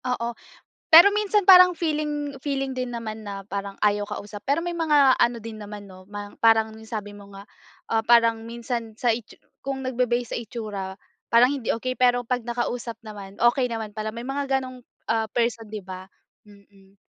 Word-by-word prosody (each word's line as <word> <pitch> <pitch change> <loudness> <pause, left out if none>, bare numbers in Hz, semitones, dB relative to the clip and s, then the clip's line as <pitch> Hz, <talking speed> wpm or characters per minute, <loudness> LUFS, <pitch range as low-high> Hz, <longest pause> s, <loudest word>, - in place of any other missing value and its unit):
Oo, 240 -2 -2 0.6
pero 340 +5 +9
minsan 420 -1 +1
parang 365 -2 +8
feeling 295 -3 -2
feeling 270 -2 -2
din 255 -1 -3
naman 225 -2 -6
na 200 -2 -7
parang 200 0 -5
ayaw 205 0 +1
kausap. 205 0 -7
Pero 320 +5 +1
may 350 - -2
mga 300 -5 +4
ano 240 -1 +2
din 225 -1 -9
naman, 205 0 -8
'no, 185 0 -15
mang 205 0 -8
parang 225 -1 +4 0.2
sabi 205 -2 -5
mo 200 -1 -13
nga, 200 - -11 0.5
ah, 225 -1 +2
parang 230 0 +4
minsan 230 -1 -5
sa 240 -1 +2
itsu 225 -1 -8 0.2
kung 270 0 -4
nagbe-base 245 -2 -1
sa - - -2
itsura, 210 -5 -6 0.3
parang 245 +4 +5
hindi 265 -5 -5
okey. 255 +3 -1
Pero 245 -1 +3
pag 250 +1 -1
nakausap 240 0 -3
naman, 200 -2 -10
okey 245 +2 +3
naman 220 -2 -5
pala 215 0 -4
may 235 +2 -7
mga 270 0 -1
ganong, 255 -1 -7 0.2
ah, 225 -1 0
person. 230 -1 -1
'di 210 -3 -7
ba? 185 0 -9 0.4
Mm. 200 -1 -21
235 Hz, 180 wpm, -24 LUFS, 210-260 Hz, 0.6 s, pero